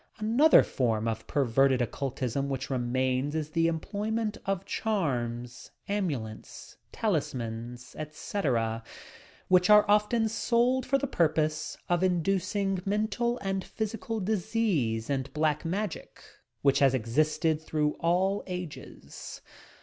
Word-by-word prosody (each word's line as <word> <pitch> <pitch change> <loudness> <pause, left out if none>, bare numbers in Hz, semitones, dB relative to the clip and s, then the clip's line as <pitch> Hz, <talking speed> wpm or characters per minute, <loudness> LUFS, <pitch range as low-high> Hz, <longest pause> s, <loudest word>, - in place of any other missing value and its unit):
Another 235 +8 +5
form 115 -3 0
of 115 0 -3
perverted 135 -1 +3
oc 120 -3 -1
cultism 135 0 -2
which 135 -1 -4
remains 130 +3 0
is 155 -1 -2
the 165 0 +2
employment 210 +6 -2
of 195 -1 -1
charms, 125 - -2 0.2
amulets, 145 - -4 0.2
talismans, 125 - -3
etc., 135 - -2 0.6
which 180 0 +4
are 210 0 +8
often 210 +2 +3
sold 235 +4 +1
for 275 +1 +3
the 275 - -2
purpose 155 - 0
of 175 0 +1
inducing 190 +1 0
mental 220 +4 0
and 195 -1 -1
physical 225 +2 -4
disease 185 - 0
and 135 -1 -2
"Black 150 -1 +1
Magic" 195 +2 -4 0.4
which 140 -1 +4
has 135 -2 +4
existed 155 +6 +1
through 150 -1 0
all 185 +4 +1
ages. 180 -4 -8
160 Hz, 115 wpm, -29 LUFS, 130-205 Hz, 0.6 s, are